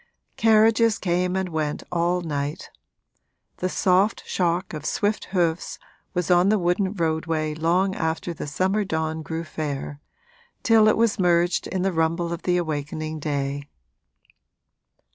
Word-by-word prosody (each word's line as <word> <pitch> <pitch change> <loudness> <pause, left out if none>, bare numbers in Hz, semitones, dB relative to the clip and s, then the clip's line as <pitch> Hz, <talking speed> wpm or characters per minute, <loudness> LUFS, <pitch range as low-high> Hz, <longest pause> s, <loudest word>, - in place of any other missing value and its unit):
Carriages 225 0 +4
came 180 0 0
and 190 -1 -1
went 155 -2 -2
all 175 +1 +1
night; 145 -3 -4 0.9
the 185 - -1
soft 190 +4 +2
shock 175 0 -1
of 150 -2 -6
swift 205 +6 -1
hoofs 175 -3 -1 0.4
was 180 -1 0
on 180 +2 +5
the 215 - +4
wooden 185 +1 +1
roadway 160 -3 -1
long 175 +5 +1
after 165 0 -2
the 155 - -6
summer 190 +8 0
dawn 160 -3 -2
grew 160 +1 -4
fair 145 -2 -5 0.6
till 225 -2 +5
it 215 - +4
was 225 -3 +2
merged 175 -1 +2
in 185 -1 -2
the 195 -1 0
rumble 165 +1 0
of 170 - -6
the 180 -1 +1
awakening 155 -1 -3
day. 140 -1 -3
175 Hz, 140 wpm, -24 LUFS, 160-190 Hz, 0.9 s, on